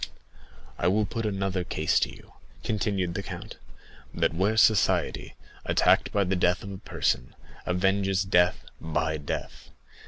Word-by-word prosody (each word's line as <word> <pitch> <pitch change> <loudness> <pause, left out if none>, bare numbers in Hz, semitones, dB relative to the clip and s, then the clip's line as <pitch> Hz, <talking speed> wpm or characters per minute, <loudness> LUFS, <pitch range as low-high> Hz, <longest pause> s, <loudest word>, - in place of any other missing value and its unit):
"I 85 - +1
will 105 +3 +3
put 115 +1 -3
another 95 -2 -1
case 80 -3 +1
to - - 0
you," - - -15 0.3
continued 100 -4 -1
the - - -3
count; - - -8 0.6
"that - - +1
where 100 +6 +1
society, 110 -2 +2 0.3
attacked - - +3
by 100 - +2
the 95 0 0
death 90 0 +1
of 100 - -7
a 95 - -6
person, 60 0 -1 0.3
avenges 95 +1 +1
death 90 -1 +2
by 80 0 -1
death. 75 - -6
95 Hz, 145 wpm, -27 LUFS, 90-100 Hz, 0.6 s, will